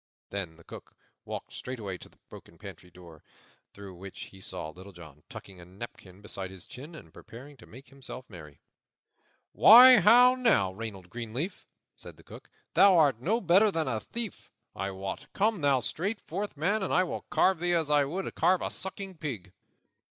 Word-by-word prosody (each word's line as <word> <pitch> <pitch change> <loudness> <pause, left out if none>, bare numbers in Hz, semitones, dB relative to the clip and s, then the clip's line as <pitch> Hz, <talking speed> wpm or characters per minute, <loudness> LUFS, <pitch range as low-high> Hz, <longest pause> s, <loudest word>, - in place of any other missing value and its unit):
Then 95 -5 -5
the 85 - -19
Cook - - -12 0.3
walked - - -7
straightway 105 -8 -6
to - - -10
the - - -26
broken - - -14
pantry 90 - -12
door, 85 -3 -15 0.5
through 100 -2 -11
which 95 +2 -11
he 95 - -15
saw 80 - -6
Little 95 +5 -13
John 80 -4 -14
tucking 95 -2 -11
a 85 - -12
napkin 95 0 -11
beneath 95 -2 -6
his 95 -2 -12
chin 145 +7 -11
and - - -13
preparing 135 +5 -13
to 115 - -16
make 130 +5 -14
himself 130 -2 -10
merry. 75 -7 -13 0.9
"Why, 250 +3 +9
how 245 +4 +7
now, 230 - +2
Reynold 95 -4 -8
Greenleaf?" 120 - -5 0.3
said - - -12
the - - -18
Cook, - - -14 0.2
"thou 195 -2 +6
art 140 -8 +3
no 215 - 0
better 195 +2 +4
than 165 -5 -1
a 115 -4 -1
thief, 230 - -7 0.2
I 95 +1 -3
wot. 95 +9 -6
Come 210 -2 0
thou 140 -3 +2
straight 185 - -3
forth, 205 -6 -6
man, 200 +8 0
or 190 - -3
I 185 - +3
will 180 - -5
carve 175 +1 +2
thee 175 0 +1
as 160 -3 -1
I 145 -1 +4
would 180 +7 -5
carve 185 0 +2
a - - -3
sucking 190 -1 -7
pig." 105 - -6
130 Hz, 185 wpm, -28 LUFS, -, 0.9 s, Why